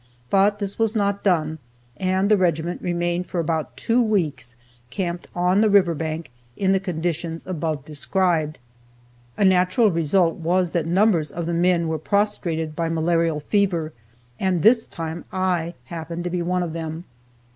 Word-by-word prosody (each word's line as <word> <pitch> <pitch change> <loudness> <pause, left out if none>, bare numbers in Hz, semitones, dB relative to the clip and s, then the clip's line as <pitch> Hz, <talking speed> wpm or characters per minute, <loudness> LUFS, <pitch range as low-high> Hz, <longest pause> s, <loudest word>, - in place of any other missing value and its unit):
But 200 +1 +4
this 200 0 -2
was 225 0 +1
not 200 -1 0
done, 160 -5 +1 0.4
and 185 +5 +1
the - - +7
regiment 175 -2 0
remained 175 0 -1
for 175 - -3
about 155 -6 -2
two 230 - +2
weeks 165 - -1 0.3
camped 175 +5 -4
on 180 +3 +3
the 220 - +4
river 190 -4 +4
bank, 160 -1 -4 0.3
in 190 -1 +2
the 195 - +3
conditions 170 -2 -3
above 160 -5 -3
described. 155 +1 0 0.8
A 200 - +3
natural 185 +4 +4
result 165 +1 +2
was 175 +1 +1
that 165 -2 -1
numbers 175 -4 +3
of 170 -1 -4
the 170 - -2
men 170 0 +2
were 160 -1 -2
prostrated 170 -5 -1
by 165 0 -1
malarial 165 -1 +1
fever, 170 -4 0 0.5
and 185 -4 0
this 225 0 +5
time 165 0 -6
I 180 -3 -1
happened 165 +3 -6
to 175 - -3
be 180 0 -1
one 180 +1 0
of 165 -2 -4
them. 160 0 -5
175 Hz, 160 wpm, -23 LUFS, 160-190 Hz, 0.8 s, the